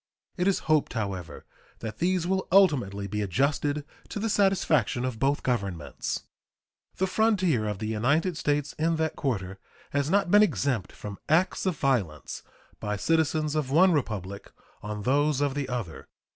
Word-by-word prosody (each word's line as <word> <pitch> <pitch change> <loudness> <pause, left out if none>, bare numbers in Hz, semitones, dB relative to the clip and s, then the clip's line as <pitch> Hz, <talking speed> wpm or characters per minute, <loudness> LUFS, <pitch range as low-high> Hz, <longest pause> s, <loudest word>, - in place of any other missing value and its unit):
It 180 +1 0
is 195 - +3
hoped, 155 -4 +2
however, 95 - -4 0.3
that 110 -2 -7
these 180 0 +1
will 190 +1 0
ultimately 130 - +3
be 105 +2 -3
adjusted 145 - 0 0.2
to - - -5
the 225 +2 -1
satisfaction 165 - +2
of 125 -4 -4
both 140 +3 +1
Governments. 100 - -2 0.7
The 190 - +2
frontier 185 - +2
of 105 -2 -2
the 110 - -5
United 140 - +1
States 145 -1 -1
in 165 +1 +2
that 160 -1 -1
quarter 95 -8 -3 0.3
has 140 +1 0
not 195 -1 +2
been 205 - +7
exempt 130 - +1
from 100 -2 -8
acts 175 +4 +2
of 180 -5 0
violence 100 - -1 0.4
by 105 -1 -2
citizens 155 +2 +1
of 155 -4 -1
one 180 +7 +5
Republic 100 - -3 0.3
on 105 0 -5
those 145 +3 +2
of 145 -2 +1
the 140 -2 -3
other. 120 -10 -5
140 Hz, 160 wpm, -27 LUFS, 105-165 Hz, 0.7 s, been